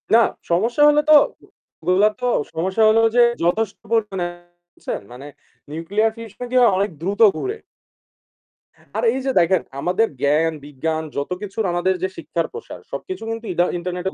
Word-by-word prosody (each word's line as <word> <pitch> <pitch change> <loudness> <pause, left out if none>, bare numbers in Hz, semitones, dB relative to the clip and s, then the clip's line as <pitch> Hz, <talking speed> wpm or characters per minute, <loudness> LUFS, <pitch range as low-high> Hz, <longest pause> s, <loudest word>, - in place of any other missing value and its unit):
না, 230 - +7 0.3
সমস্যা 230 +11 +1
হইল 295 0 +5
তো - - +10 0.7
ওগুলা 185 +5 +3
তো 250 - 0 0.3
সমস্যা 190 +6 -1
হইলো 225 +1 +5
যে 240 - +7 0.2
যথেষ্ট 200 +4 0 0.2
পরিমাণে 205 -5 0 0.5
বুঝছেন? - - -5
মানে 135 +4 -10 0.4
nuclear 200 +8 0
fusion 230 +2 -8
কি - - -2
হয় 240 -4 +6
অনেক 200 +2 +1
দ্রুত 200 +5 -2 0.2
ঘুরে। 410 +3 -3 1.4
আর - - -1
এই 265 - -2
যে 270 - +1
দেখেন 175 +1 +3 0.2
আমাদের 185 +8 +1
জ্ঞান, 155 +3 +2
বিজ্ঞান 160 +3 -3
যত 140 +5 -3
কিছুর 205 +2 -3
আমাদের 175 +2 +1
যে 190 - +1
শিক্ষার 165 +1 -3
প্রসার 455 0 -9
সবকিছু 375 - -6
কিন্তু 225 0 -5
ইদা 175 +1 +2
ইন্টারনেটের 180 +1 -4
190 Hz, 155 wpm, -21 LUFS, 170-225 Hz, 1.4 s, তো